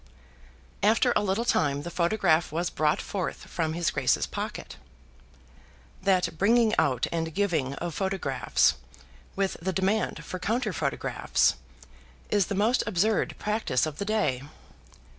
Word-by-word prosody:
After 230 +4 +3
a - - +3
little 205 +3 0
time 145 -10 +1
the 175 - -6
photograph 170 -3 +2
was 170 +3 -1
brought 155 0 +1
forth 195 -3 -4
from 160 -3 -2
his 170 0 0
Grace's 140 -3 +1
pocket. - - -6 1.2
That 185 -4 +1
bringing 225 +2 +4
out 130 -6 +2
and 165 -1 -3
giving 160 -9 0
of 170 +1 -4
photographs, 190 -9 +1 0.6
with 195 -1 -1
the 190 +3 -1
demand 195 +4 -1
for 185 - -5
counter 235 +7 -1
photographs, - - +1 0.8
is 205 -3 +3
the 200 - -2
most 220 +6 +2
absurd 210 +2 +1
practice 210 - 0
of 155 -2 -6
the 200 - -2
day. 210 -12 0
185 Hz, 135 wpm, -27 LUFS, 160-210 Hz, 1.2 s, bringing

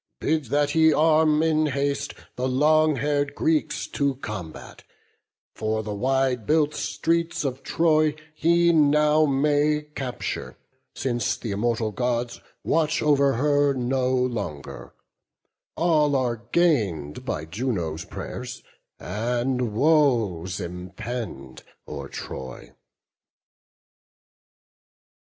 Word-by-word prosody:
Bid 155 -1 0
that 145 +4 +1
he 160 +1 +5
arm 155 0 +4
in 155 -1 +2
haste 140 0 -2 0.2
the 125 +1 -1
long 155 +3 +3
hair'd 145 +1 -1
Greeks 160 -1 0
To 140 -1 0
combat; 100 - -8 0.7
for 110 0 -2
the 105 -1 -4
wide 130 0 0
built 150 -1 +2
streets 165 -2 -1
of 130 -1 -3
Troy 155 -2 +2 0.2
He 170 +2 +3
now 150 0 +4
may 145 +2 +2
capture; 130 -4 -5 0.4
since 120 -3 -1
th' - - -14
immortal 110 +1 -1
Gods 120 +1 -2 0.2
Watch 160 -1 +1
over 140 -2 +3
her 145 +2 +2
no 130 0 0
longer; 85 - -3 0.8
all 155 -4 +3
are 120 -3 -1
gain'd 105 - +1
By 75 - -3
Juno's 85 -4 -3
pray'rs; - - -7 0.4
and 120 - -1
woes 115 - +2
impend 90 - -6 0.3
o'er 70 -2 -6
Troy." 65 -2 -8
130 Hz, 100 wpm, -24 LUFS, 110-150 Hz, 0.8 s, he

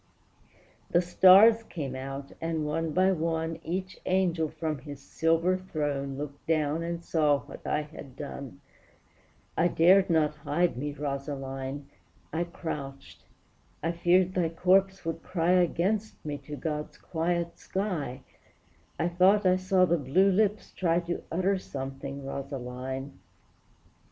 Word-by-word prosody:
The 175 - +4
stars 195 +6 +7
came 145 - -5
out; 135 +1 -6
and, 165 -2 -1
one 160 +2 -1
by 185 +4 +3
one, 165 -1 -1
Each 185 +2 -4
angel 175 -4 +1
from 155 -2 -3
his 145 +1 -9
silver 165 +5 +1
throne 145 -6 -3
Looked 145 0 -7
down 155 -1 +1
and 170 0 -4
saw 150 -5 +2
what - - -11
I 150 - 0
had 145 -3 -11
done; 140 -1 -8 0.9
I 175 - +3
dared 185 +3 +5
not 155 -2 +2
hide 165 +3 0
me, 145 +4 -3
Rosaline! 140 -1 -4 0.5
I 170 +2 0
crouched; 140 -5 -7 0.6
I 165 - +1
feared 180 +2 +3
thy 175 -3 +1
corpse 190 +2 +2
would 165 0 -3
cry 175 -1 0
Against 185 +4 +1
me 145 -1 -3
to 150 - -5
God's 150 0 -4
quiet 170 0 -2
sky, 175 -10 -3 0.7
I 165 - +1
thought 185 +4 +4
I 185 0 +5
saw 185 0 +3
the 175 -1 +1
blue 175 +9 +3
lips 210 +2 +1
try 170 -2 +1
To 170 0 -4
utter 185 +3 +1
something, 135 -2 -6
Rosaline! 135 0 -5
165 Hz, 135 wpm, -28 LUFS, 145-180 Hz, 0.9 s, stars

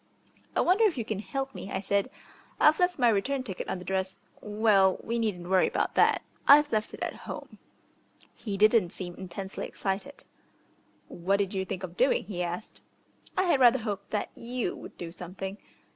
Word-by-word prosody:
"I - - +3
wonder 380 +6 +4
if 370 -9 +2
you 230 - -2
can 215 -3 -3
help 270 +5 -4
me," 195 - -8
I 190 - -1
said. 200 +4 0 0.5
"I've 305 +1 +5
left 360 0 +2
my 240 -4 +4
ticket 255 -6 -4
on - - -1
the 180 - -10
dress 190 0 -2 0.2
Well, 205 -3 +3
we 235 +1 -1
needn't 190 -6 -2
worry 185 0 +4
about - - -1
that, - - +4 0.2
I've 295 +1 +7
left 215 -1 -1
it - - -16
at - - -6
home." - - -8 0.7
He 205 -4 -5
didn't 215 -2 +5
seem 175 0 -7
intensely 190 +2 -6
excited. 205 +9 -4 0.8
"What 185 +3 0
did 200 -1 -1
you 190 -1 -1
think 185 0 -5
of 180 -1 -7
doing?" 255 +2 +3
he 185 -2 -5
asked. 175 +4 -5 0.6
"I - - +4
had 345 -7 +3
rather 250 0 +7
hoped 205 -4 -4
that 210 - -2
you 240 -4 -3
would - - -11
do 170 -1 -6
something." 185 +3 -7
205 Hz, 185 wpm, -28 LUFS, 190-245 Hz, 0.8 s, I've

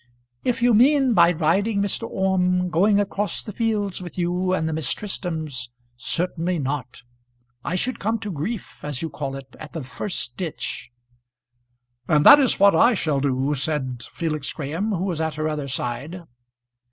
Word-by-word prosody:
"If 240 -1 0
you 245 -1 +5
mean 265 +2 +5
by 170 -3 +6
riding, 190 +6 +1
Mr. 200 -1 0
Orme, 180 -1 +1
going 200 +4 +4
across 205 0 -1
the 210 - -7
fields 210 -4 -1
with 175 0 -9
you 180 +1 0
and 160 -4 0
the 160 - -2
Miss 155 -4 0
Tristrams, 160 -10 -4 0.3
certainly 175 +6 -1
not. 135 -3 -4 0.6
I 180 - -2
should 245 +7 -1
come 220 +3 0
to 205 -2 -4
grief, 180 +8 -5
as 150 0 -4
you 160 - -3
call 140 -1 -4
it, 135 -2 -10
at 150 - -10
the 160 - -4
first 130 -1 -3
ditch." 170 -7 -4 1.2
"And 150 -1 +3
that 290 - +11
is 265 -5 +4
just - - -7
what 200 -2 +6
I 235 +9 +5
shall 155 -7 0
do," 135 +1 0
said 130 -4 -2
Felix 155 -4 -3
Graham, 160 +8 -3
who 185 -3 -1
was 175 -5 -2
at 160 -1 -2
her 155 0 -1
other 150 -2 -3
side. 140 +7 -4
170 Hz, 175 wpm, -23 LUFS, 145-200 Hz, 1.2 s, that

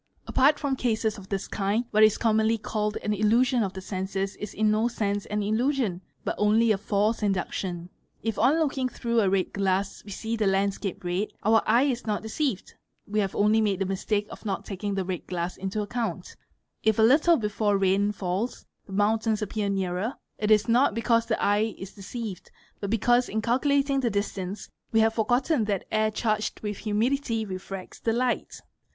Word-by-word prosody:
part 285 +3 +4
aia 275 -1 +1
cases 220 -3 -1
of 190 - -13
this 195 -1 -2
kind, 205 +4 -1
what 215 - +3
is 215 -1 +6
commonly 220 0 +2
called 210 -1 -2
an 210 - 0
"illusion 235 +5 +3
of 195 -3 0
'senses'? 190 +1 -3
is 210 - -6
in 215 0 +1
no 215 +2 +2
sense 205 -4 -2
an 210 0 -1
illusion 220 -3 0 0.2
but - - 0
only 220 +2 +4
a 210 - +2
false 210 +2 0
induction. 185 -3 -2 0.4
If 225 -2 -2
B - - 0
tooksing 270 -1 +2
through 235 -1 0
a 195 - +2
red 190 -1 0
glass 195 0 -1
we - - -12
see 225 +3 -3
the 215 -3 +1
landscape 195 0 -1
red, 180 +4 -1 0.2
our 220 +1 +5
eye 235 +4 +5
is 255 -4 -1
not 210 0 -1
ceived; 220 -2 -2 0.3
we 210 +1 -1
have 195 -2 -1
only 210 +2 +3
made 205 -3 +1
the 195 - -1
mistake 205 +2 -1
of - - -10
not 200 -3 -3
taking 200 0 -3
the 190 -1 -1
red 180 -2 -4
glass 180 0 -3
into 195 +2 -3
ae - - -4
bunt. 235 +2 -4 0.5
If 220 -1 +2
a 220 - +4
little 305 +8 +5
before 210 -2 0
rain 195 +1 +2
falls, 195 +4 -3 0.2
the 195 - -9
mountains 215 +1 +1
appear 210 0 -2
nearer, 195 +4 -1 0.2
it 210 - 0
is 215 -1 +6
t 230 - +2 0.2
because 230 0 +2
the - - 0
eye 210 +2 +1
is 190 0 -8
deceived 205 -1 -7 0.3
but 200 - -4
because 240 +3 +2
in 220 +1 -2
calculating 275 +3 +2
the 250 -3 +1
distance 200 -1 -3 0.2
we 225 -1 +4
ye 225 - +5
forgotten 245 +4 +1
that 200 -3 -1
air 215 0 +2
charged 215 0 -1
with 210 -2 -4
humidity 225 +2 0
refracts 190 -1 -7
the 225 - 0
light. 245 +1 -1
215 Hz, 190 wpm, -26 LUFS, 195-230 Hz, 0.5 s, is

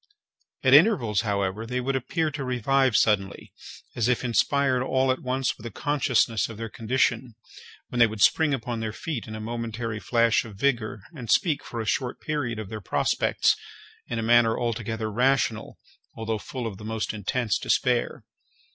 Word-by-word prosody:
At 130 -1 +4
intervals, 145 - +5
however, 100 -1 -1
they 125 +1 -2
would 135 +2 -1
appear 155 +5 -1
to 145 -1 -5
revive 130 0 +1
suddenly, 100 -3 0 0.4
as 115 -1 +1
if 125 0 +1
inspired 130 +2 +2
all 130 0 +2
at 130 - -2
once 130 0 -1
with 110 - -14
a - - -5
consciousness 130 -6 +1
of 115 - -9
their 115 0 -5
condition, 120 +1 0 0.5
when 125 - -3
they 120 - +7
would 110 -2 -1
spring 160 -2 +4
upon 120 -3 -2
their 110 -1 -3
feet 140 -3 -5
in 110 - -6
a - - -6
momentary 115 0 -4
flash 115 0 +2
of 110 -3 -11
vigour, 110 -3 -1
and 125 -6 -8
speak, 155 +1 +2
for 120 - -6
a 110 - -3
short 125 +3 -1
period, 145 -7 -3
of 110 -3 -6
their 110 -1 -6
prospects, - - +1 0.5
in 120 - -3
a 115 - -2
manner 115 0 +4
altogether 115 -2 -2
rational, 125 -1 +1 0.4
although 110 -1 -2
full 125 +3 -6
of 105 -4 -5
the - - -10
most 110 0 -3
intense 105 +1 -1
despair. 125 -2 0
120 Hz, 175 wpm, -26 LUFS, 110-130 Hz, 0.5 s, they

